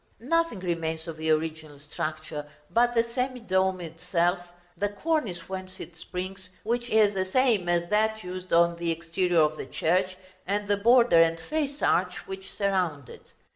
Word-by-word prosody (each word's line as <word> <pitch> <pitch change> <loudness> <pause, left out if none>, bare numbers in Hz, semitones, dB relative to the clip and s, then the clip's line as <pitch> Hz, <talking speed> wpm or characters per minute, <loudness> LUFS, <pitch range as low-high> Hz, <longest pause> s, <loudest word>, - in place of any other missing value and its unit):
Nothing 285 - 0
remains 165 -2 -2
of 165 - -5
the 160 0 -2
original 155 -1 -1
structure 155 0 -5 0.2
but 240 +1 +3
the 230 - +4
semi 250 +2 -3
dome 190 -4 +1
itself, 175 +2 0 0.4
the 205 - -1
cornice 205 - -2
whence 185 0 -6
it 170 - -9
springs, 185 +3 -6
which 240 +2 -1
is 215 -2 +4
the 190 -1 0
same 215 -3 +2
as 175 0 +1
that 220 +1 +1
used 185 0 -7
on 170 0 +4
the 170 0 -2
exterior 170 +1 +1
of 155 0 +2
the - - -6
church, 185 +2 0 0.3
and 205 +1 -1
the 205 0 +2
border 235 -4 +6
and 165 0 +3
face 290 - -3
arch 180 +1 +1
which 190 0 -8
surround 180 - -1
it. - - -14
185 Hz, 170 wpm, -27 LUFS, 165-215 Hz, 0.4 s, border